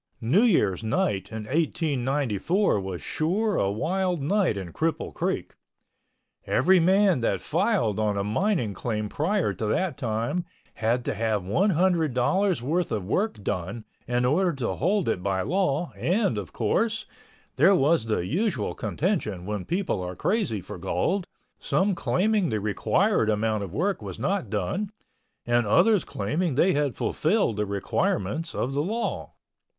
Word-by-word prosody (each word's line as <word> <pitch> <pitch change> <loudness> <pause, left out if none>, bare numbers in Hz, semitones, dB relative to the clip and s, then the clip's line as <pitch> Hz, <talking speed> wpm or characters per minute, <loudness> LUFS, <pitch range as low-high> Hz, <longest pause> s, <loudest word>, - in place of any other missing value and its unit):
New 130 - +3
Year's 115 - +2
night 105 -2 -1
in 110 -1 -5
1894 145 - 0
was 95 -2 -5
sure 200 +7 0
a 100 - +1
wild 180 - -1
night 170 - +1
in 90 -3 -6
Cripple 160 -1 -2
Creek. - - -2 0.9
Every 185 +8 +4
man 190 -1 +4
that 100 -5 0
filed 105 +3 +1
on 105 -2 0
a 100 - 0
mining 120 - 0
claim 105 +1 -3
prior 165 - 0
to 105 +4 -3
that 170 - 0
time 120 +7 -1 0.3
had 115 +3 0
to - - -1
have 110 -2 -1
one 180 - +2
hundred 170 -6 +2
dollars' 185 - +1
worth 165 +5 0
of 105 -5 -2
work 190 - -1
done 100 +3 -3 0.2
in 125 0 +1
order 175 +8 +2
to 135 -4 -2
hold 190 +3 0
it 105 -5 0
by 95 -1 0
law 175 - 0
and, 190 - +1
of 100 - -7
course, 220 - 0 0.5
there 195 - +6
was 150 -5 +3
the 105 -6 -1
usual 185 - -1
contention 145 - -2
when 105 -2 -3
people 175 - -1
are 90 0 -5
crazy 190 - 0
for 95 +1 -9
gold, 180 - -1 0.3
some 195 +1 +1
claiming 200 +2 +1
the 110 -2 -1
required 110 - +1
amount 110 0 0
of 100 -4 -5
work 185 - -1
was - - -7
not 195 - -1
done—and 185 - -3
others 185 - +4
claiming 150 - -2
they 180 +6 +4
had 145 -4 0
fulfilled 160 - +1
the 105 0 -1
requirements 100 - -1
of 130 - -1
the 140 - +1
law. 220 +9 -3
140 Hz, 155 wpm, -26 LUFS, -, 0.9 s, there